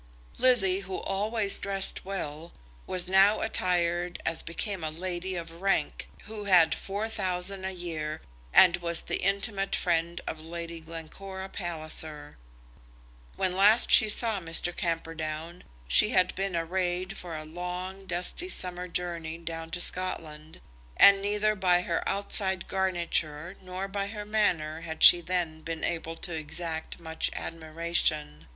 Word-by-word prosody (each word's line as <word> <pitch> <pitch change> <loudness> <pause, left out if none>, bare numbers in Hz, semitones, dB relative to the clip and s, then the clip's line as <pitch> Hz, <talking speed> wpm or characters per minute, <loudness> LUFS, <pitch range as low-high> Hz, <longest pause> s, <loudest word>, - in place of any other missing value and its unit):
Lizzie, 195 -7 +4
who 190 -1 -6
always 205 +1 0
dressed 195 -1 +1
well, 170 -4 -6 0.3
was 180 -1 0
now 195 +3 +4
attired 175 -4 0
as 165 - +1
became 190 +2 -4
a 155 - -2
lady 180 +3 -4
of 165 0 -8
rank, 195 -6 -1
who 210 -1 -7
had 175 -5 +5
four 200 +3 -4
thousand 190 -2 -3
a 190 - -2
year, 160 -4 -5 0.3
and 175 -2 +6
was 170 -1 -2
the - - -3
intimate 195 0 -1
friend 170 -1 0
of 160 - -5
Lady 170 0 -7
Glencora 180 +4 -8
Palliser. 155 -4 -4 1.0
When 185 -1 -1
last 210 +5 +5
she 220 - +8
saw 220 -1 +3
Mr. 170 0 -1
Camperdown 165 0 -4 0.2
she 210 - +6
had 185 -6 +2
been 195 -1 -3
arrayed 180 +2 -2
for 170 -4 -7
a 155 - -7
long, 180 +4 -6
dusty 180 - -2
summer 180 - -3
journey 170 -2 -4
down 165 -1 -7
to 170 +2 -4
Scotland, 160 -4 -3 0.4
and 200 0 +7
neither 210 +1 +1
by 180 -3 +2
her 170 -2 -2
outside 190 -2 +4
garniture 175 -3 -1
nor 185 +1 -5
by 200 0 -3
her 210 0 -7
manner 170 -7 0
had 160 -1 -4
she 175 - +11
then 170 -3 -3
been 165 0 -6
able 165 -1 -3
to 175 - -5
exact 160 +1 -4
much 160 -1 -1
admiration. 160 - -2
175 Hz, 140 wpm, -28 LUFS, 165-195 Hz, 1.0 s, she